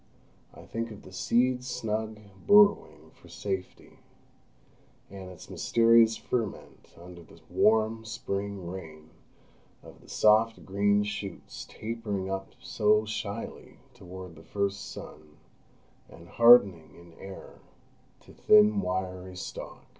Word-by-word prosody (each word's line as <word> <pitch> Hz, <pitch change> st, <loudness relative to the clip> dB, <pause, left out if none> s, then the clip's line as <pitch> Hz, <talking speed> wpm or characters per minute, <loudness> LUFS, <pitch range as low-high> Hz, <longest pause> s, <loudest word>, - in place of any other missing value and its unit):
I -, -, -14 dB
think 115 Hz, 0 st, -4 dB
of 105 Hz, -2 st, -11 dB
the 95 Hz, -, -13 dB
seed 125 Hz, +7 st, +1 dB
snug 110 Hz, -3 st, -3 dB, 0.3 s
burrowing 205 Hz, -, +4 dB
for -, -, -20 dB
safety, 95 Hz, -2 st, -6 dB, 1.1 s
and 95 Hz, -2 st, -9 dB
its 90 Hz, -, -12 dB
mysterious 115 Hz, -1 st, +3 dB
ferment 115 Hz, -5 st, -5 dB
under 90 Hz, 0 st, -12 dB
the 85 Hz, -, -17 dB
warm 110 Hz, +1 st, +2 dB
Spring 100 Hz, -3 st, -5 dB
rain, 80 Hz, -4 st, -9 dB, 0.7 s
of -, -, -15 dB
the -, -, -19 dB
soft 110 Hz, +1 st, +3 dB
green 100 Hz, +1 st, +2 dB
shoots 100 Hz, -2 st, -7 dB
tapering 110 Hz, -4 st, -5 dB
up 95 Hz, 0 st, -5 dB
so 105 Hz, +1 st, +1 dB
shyly 110 Hz, +3 st, -6 dB, 0.2 s
toward 95 Hz, -5 st, -10 dB
the 80 Hz, -, -14 dB
first 100 Hz, +1 st, -3 dB
sun, 75 Hz, 0 st, -12 dB, 0.7 s
and 85 Hz, +1 st, -15 dB
hardening 100 Hz, -10 st, +5 dB
in 85 Hz, -1 st, -16 dB
air 95 Hz, 0 st, -11 dB, 0.6 s
to -, -, -17 dB
thin 105 Hz, -1 st, +5 dB
wiry 95 Hz, 0 st, -4 dB
stalk. 90 Hz, -, -8 dB
100 Hz, 115 wpm, -28 LUFS, 95-110 Hz, 1.1 s, hardening